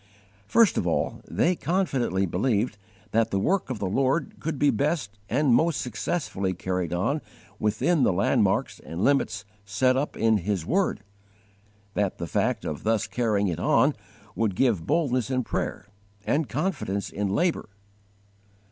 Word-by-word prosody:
First 230 - +4
of 90 - -1
all, 85 - -1
they 180 +2 +2
confidently 135 - 0
believed 105 +5 0 0.4
that 115 0 +2
the 100 - 0
work 185 - +1
of 130 - -3
the 100 - -3
Lord 135 - 0
could 155 -2 -3
be 145 +1 +4
best 130 -5 -1
and 145 -4 +3
most 160 +5 +3
successfully 105 - -2
carried 90 -1 -2
on 95 - 0 0.4
within 110 +10 +1
the - - +4
landmarks 95 +2 +1
and 85 +5 -5
limits 135 -7 +1 0.2
set 125 +6 +2
up 140 +3 -2
in 110 -1 +3
His 95 -3 -2
word; 190 - +1 0.9
that 100 -2 0
the - - -4
fact 85 - -1
of 75 - -4
thus 110 0 +1
carrying 110 -4 0
it 85 -4 -2
on - - +3 0.4
would 110 -4 0
give 110 -8 +1
boldness 130 -6 +1
in 130 -1 0
prayer 100 - -3 0.4
and 150 0 0
confidence 100 - -2
in 100 0 -2
labour. 170 - 0
115 Hz, 150 wpm, -26 LUFS, 100-145 Hz, 0.9 s, First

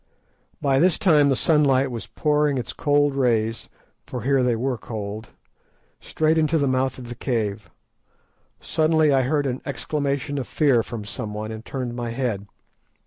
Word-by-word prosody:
By 135 -1 +2
this 175 +2 +3
time 155 -9 +4
the 135 - +3
sunlight 140 -3 +3
was 115 -2 -6
pouring 150 -2 +1
its 125 - -4
cold 145 -1 +2
rays, 115 -4 0 0.4
for 125 -3 -5
here 135 +1 +2
they 125 -2 +2
were 125 +1 -2
cold, 105 -1 -6 0.7
straight 160 +1 +1
into 155 +1 +2
the 140 -2 +1
mouth 130 0 0
of 125 -2 -9
the 120 - -6
cave. 110 -5 -2 0.9
Suddenly 155 -2 +2
I 135 - +4
heard 145 +3 0
an 130 -1 -2
exclamation 140 0 -2
of 130 - -5
fear 140 -7 +3
from 110 -2 -7
someone, 105 +1 -5
and 110 0 -7
turned 125 -2 -5
my 120 -1 -3
head. 115 -5 -3
130 Hz, 160 wpm, -23 LUFS, 115-145 Hz, 0.9 s, time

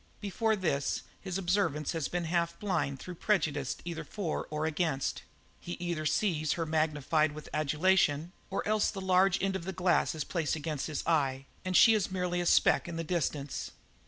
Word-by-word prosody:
Before 220 +2 0
this 145 -8 -1 0.2
his 190 -2 -4
observance 175 -6 0
has 165 -5 -2
been 175 0 -2
half 170 0 0
blind 185 -9 -1
through 180 - -7
prejudice 150 -10 +1
either 170 -2 -4
for 195 -7 -3
or 150 +1 -2
against; 160 -4 -1 0.4
he 175 - -6
either 170 -4 -2
sees 155 -5 +1
her 165 - -2
magnified 155 -1 +1
with 155 0 -9
adulation, 155 +1 +2 0.2
or 195 - -2
else 215 0 +2
the 195 - -5
large 190 0 +3
end 195 -1 +1
of 190 - -3
the 190 - -2
glass 180 -2 +2
is 155 - -2
placed 160 0 -1
against 155 -2 -3
his 155 -2 -4
eye 135 -5 +1 0.2
and 185 -1 +2
she 225 - +8
is 210 -4 +1
merely 180 -1 -1
a 175 - -1
speck - - +4
in 170 - -5
the 165 - -2
distance. 150 -4 -2
170 Hz, 185 wpm, -31 LUFS, 150-185 Hz, 0.4 s, she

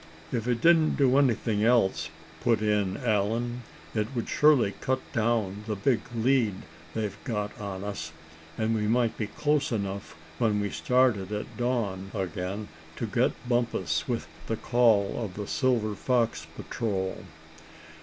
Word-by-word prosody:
"If 115 -1 -2
it 120 -2 0
didn't 165 -2 +5
do 135 -1 +4
anything 115 -5 +2
else," 115 -4 +3 0.3
put 115 -3 +2
in 105 -3 +1
Allan, 115 +3 0 0.3
"it 105 -1 0
would 120 - -2
surely 140 -9 +4
cut 130 0 +1
down 110 -3 0
the 110 - -1
big 120 +4 +2 0.2
lead 115 -3 +2 0.4
they've 105 -3 -2
got 105 -5 -2
on 100 -2 -5
us, 90 -6 -5 0.5
and 110 0 +1
we 105 -1 0
might 115 0 +2
be 105 - -3
close 145 +5 0
enough 100 -3 -3 0.2
when 110 -4 +2
we 100 -1 -1
started 125 -7 +2
at 105 0 -4
dawn 110 -6 -1
again, 95 +2 -3 0.3
to - - -3
get - - 0
Bumpus 115 -10 0
with 120 -3 -2 0.2
the 115 - -1
call 115 -3 +3
of 95 -4 -6
the 105 - -4
Silver 115 -3 +1
Fox 120 +2 0
Patrol." 95 -5 -3
110 Hz, 145 wpm, -28 LUFS, 100-120 Hz, 0.5 s, didn't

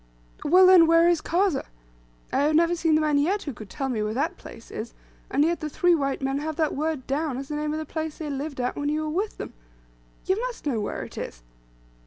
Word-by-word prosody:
"Well, 365 +5 +6
then, 365 -3 +8
where 330 +1 +5
is 345 -2 +3
Kazeh? 360 -2 +1 0.7
I - - +2
have 300 +2 +2
never 335 +2 +4
seen 325 -2 +2
the 310 - +3
man 300 -2 +2
yet 380 +8 +1
who 285 - -5
could 215 -3 -11
tell 270 -2 -3
me 240 -5 -1
where 210 +1 -2
that 300 +6 0
place 230 - -13
is, 225 +2 -6 0.3
and 290 - +3
yet 340 +1 0
the 310 - -4
three 355 +4 +3
white 275 -4 -1
men 270 +1 0
have 310 +1 -3
that 310 -1 0
word 305 -2 -2
down, 280 -1 -1
as 270 +1 -6
the 300 - -3
name 300 0 -2
of 310 - -2
the 315 - -4
place 315 0 -4
they 315 - -5
lived 280 0 -4
at 250 0 -1
when 290 0 -2
you 305 +1 0
were 310 - -3
with 400 +6 -2
them. - - -7 0.7
You 380 +4 +1
must - - -5
know 260 -7 0
where 205 - -3
it - - -8
is." - - -7
305 Hz, 250 wpm, -25 LUFS, 275-330 Hz, 0.7 s, then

